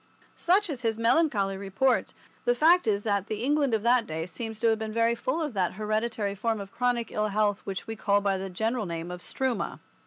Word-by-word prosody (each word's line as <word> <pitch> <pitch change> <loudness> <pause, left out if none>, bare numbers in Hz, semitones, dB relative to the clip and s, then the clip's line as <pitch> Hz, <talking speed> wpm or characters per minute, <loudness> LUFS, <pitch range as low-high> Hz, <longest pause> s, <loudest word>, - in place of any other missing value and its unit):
Such 390 +4 +2
is 280 -7 -4
his 225 -2 0
melancholy 230 -5 +2
report. 200 +7 0 0.3
The 245 - +3
fact 330 +5 +5
is 205 -1 +1
that 200 -3 0
the 215 +1 -3
England 285 -3 +2
of 215 - -2
that 240 -1 +3
day 160 -1 -3
seems 220 +5 -6
to 230 - +3
have 220 -1 +1
been 220 0 -4
very 230 +1 +2
full 255 +6 -2
of 295 -5 -3
that 185 -4 0
hereditary 215 0 -1
form 220 +2 -1
of 195 -1 -8
chronic 245 -1 0
ill 215 0 0
health 210 0 +1
which 190 -2 -4
we 225 - -5
call 205 -2 +2
by 195 -1 0
the 195 0 -4
general 220 +3 -1
name 170 +1 -5
of 180 - -6
struma. 260 -5 -2
220 Hz, 220 wpm, -27 LUFS, 200-245 Hz, 0.3 s, fact